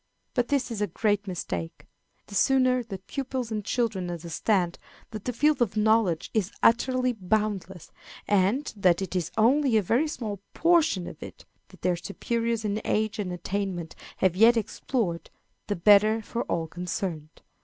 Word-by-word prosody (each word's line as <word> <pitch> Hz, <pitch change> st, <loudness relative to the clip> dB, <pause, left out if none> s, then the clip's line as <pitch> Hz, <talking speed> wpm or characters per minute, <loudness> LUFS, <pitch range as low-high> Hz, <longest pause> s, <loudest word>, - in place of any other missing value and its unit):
But 245 Hz, -2 st, +1 dB
this 275 Hz, -4 st, 0 dB
is 215 Hz, -3 st, -4 dB
a 210 Hz, -, +1 dB
great 205 Hz, -2 st, 0 dB
mistake. 90 Hz, -, -5 dB, 0.4 s
The -, -, -13 dB
sooner 255 Hz, +3 st, +3 dB
that 195 Hz, -5 st, -8 dB
pupils 260 Hz, -3 st, -4 dB
and 215 Hz, -1 st, -2 dB
children 205 Hz, -6 st, -1 dB
understand 175 Hz, +2 st, -1 dB, 0.3 s
that 215 Hz, -3 st, -7 dB
the 250 Hz, -, 0 dB
field 295 Hz, +3 st, +2 dB
of 215 Hz, -3 st, +1 dB
knowledge 215 Hz, -6 st, +2 dB
is 210 Hz, -3 st, 0 dB
utterly 255 Hz, +2 st, +3 dB
boundless, 195 Hz, -4 st, -2 dB, 0.4 s
and 205 Hz, +8 st, +1 dB
that 185 Hz, -2 st, +3 dB
it 185 Hz, -1 st, -6 dB
is 175 Hz, -2 st, -1 dB
only 250 Hz, +2 st, +4 dB
a 210 Hz, -, +2 dB
very 245 Hz, -, +2 dB
small 215 Hz, -10 st, -5 dB
portion 325 Hz, -, +3 dB
of -, -, -9 dB
it -, -, -10 dB, 0.2 s
that -, -, -19 dB
their 180 Hz, -1 st, +1 dB
superiors 230 Hz, +5 st, -2 dB
in 210 Hz, +1 st, -1 dB
age 215 Hz, 0 st, 0 dB
and 190 Hz, -3 st, -2 dB
attainment 180 Hz, -1 st, -4 dB, 0.2 s
have 185 Hz, -2 st, +2 dB
yet 230 Hz, +4 st, +6 dB
explored, 210 Hz, -5 st, -2 dB, 0.4 s
the 205 Hz, -, -1 dB
better 210 Hz, +4 st, +5 dB
for 235 Hz, +3 st, -3 dB
all 165 Hz, -1 st, -1 dB
concerned. 170 Hz, -2 st, -5 dB
210 Hz, 160 wpm, -27 LUFS, 185-235 Hz, 0.4 s, yet